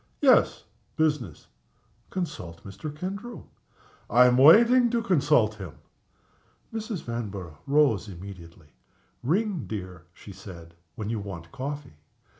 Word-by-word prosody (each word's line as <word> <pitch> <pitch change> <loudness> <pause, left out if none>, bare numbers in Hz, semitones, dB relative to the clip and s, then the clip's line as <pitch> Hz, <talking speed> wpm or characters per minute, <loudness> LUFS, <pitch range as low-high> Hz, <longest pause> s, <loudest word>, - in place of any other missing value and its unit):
"Yes - - +4 0.3
business." 150 - -1 0.6
"Consult 145 - -5
Mr. 100 +10 -7
Kendrew." 195 +10 -6 0.7
"I 125 +3 +6
am 125 0 +5
waiting 235 - +7
to 235 -1 0
consult 150 - +3
him." 95 -6 -7 1.0
Mrs. 220 -4 -4
Vanborough 100 -9 -6
rose 140 -8 +3
immediately. 85 -4 -11 0.5
"Ring, 185 - 0
dear," 90 -5 -7
she 100 - -13
said, 90 -4 -11 0.2
"when 110 0 -4
you 115 - -2
want 85 -5 -8
coffee." 140 - -6
120 Hz, 110 wpm, -26 LUFS, -, 1.0 s, waiting